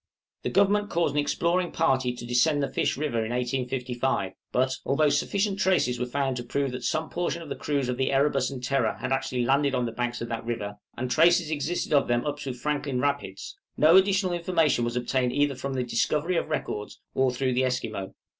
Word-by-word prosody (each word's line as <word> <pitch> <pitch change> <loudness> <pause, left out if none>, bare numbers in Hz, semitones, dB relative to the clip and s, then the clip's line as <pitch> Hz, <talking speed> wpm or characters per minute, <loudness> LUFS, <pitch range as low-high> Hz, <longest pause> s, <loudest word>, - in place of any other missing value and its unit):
The - - -2
Government 205 +1 +3
caused 170 -2 +1
an 150 - +1
exploring 170 +4 0
party 130 -6 +1
to 120 -1 -8
descend 140 +5 +2
the - - -3
Fish - - 0
River 135 -6 -1
in 110 - -4
1855; 125 -3 -1 0.2
but, 130 +1 +1
although 150 +2 +2
sufficient 200 +7 0
traces 180 -11 +2
were 125 - -1
found 135 0 -1
to 120 - -4
prove 135 +2 -1
that 125 - -6
some 160 0 -1
portion 170 -1 -2
of 155 - -11
the 140 - -3
crews 140 -3 -1
of 125 -1 -2
the 130 0 +1
'Erebus' 135 -1 +2
and 130 -2 -7
'Terror' 125 -3 0
had 130 - -3
actually 130 -2 0
landed 140 +1 +2
on 125 -1 0
the 115 - -3
banks 120 +1 -3
of 115 - -4
that 115 -1 -3
river, 105 -3 -4 0.2
and 125 +1 -3
traces 170 +3 +4
existed 155 +2 -2
of 140 - +4
them 120 +2 +1
up 145 - -2
to 135 - -4
Franklin 140 0 -2
Rapids, 140 -9 -2 0.2
no 155 +3 +6
additional 190 -1 +4
information 165 -7 +1
was 120 0 -2
obtained 125 0 0
either 145 0 +2
from 135 +1 -4
the 130 - 0
discovery 150 +8 0
of 160 - -1
records, 105 -8 -4
or 130 0 +2
through 130 +1 -1
the 130 +1 +2
Esquimaux. 115 -6 -3
135 Hz, 210 wpm, -26 LUFS, 125-150 Hz, 0.2 s, no